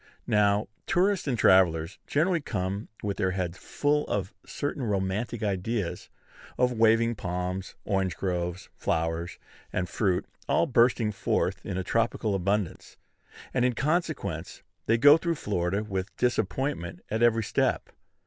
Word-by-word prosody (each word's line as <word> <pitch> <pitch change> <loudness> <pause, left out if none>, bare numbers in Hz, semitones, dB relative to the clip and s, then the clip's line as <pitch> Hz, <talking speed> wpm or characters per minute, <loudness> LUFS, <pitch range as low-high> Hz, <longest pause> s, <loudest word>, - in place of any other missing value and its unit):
Now, 105 0 +3 0.2
tourists 190 -1 +2
and 125 -3 0
travellers 90 -4 +4
generally 170 +3 +2
come 100 -4 -3 0.2
with 100 -1 -2
their 95 -3 +1
heads 90 -1 -3
full 150 +1 0
of 95 0 -2
certain 145 -1 -4
romantic 105 +2 -1
ideas 100 -1 -2 0.5
of 125 0 +3
waving 115 +1 +4
palms, 90 -1 -4
orange 95 -3 0
groves, 90 -1 -3
flowers, 80 +1 -1 0.3
and 90 -1 -1
fruit, 95 -1 0 0.2
all - - +3
bursting 120 -5 +3
forth 100 - -1
in 95 -1 -3
tropical 115 0 0
abundance; 100 0 -2 0.6
and, 125 - +2
in 125 0 +3
consequence, 155 +8 -2 0.2
they 115 - +4
go 145 +5 +8
through 170 0 -1
Florida 100 - -1
with 95 -2 -4
disappointment 120 - -1
at 110 +1 0
every 115 -1 +4
step. - - 0
105 Hz, 130 wpm, -28 LUFS, 95-120 Hz, 0.6 s, go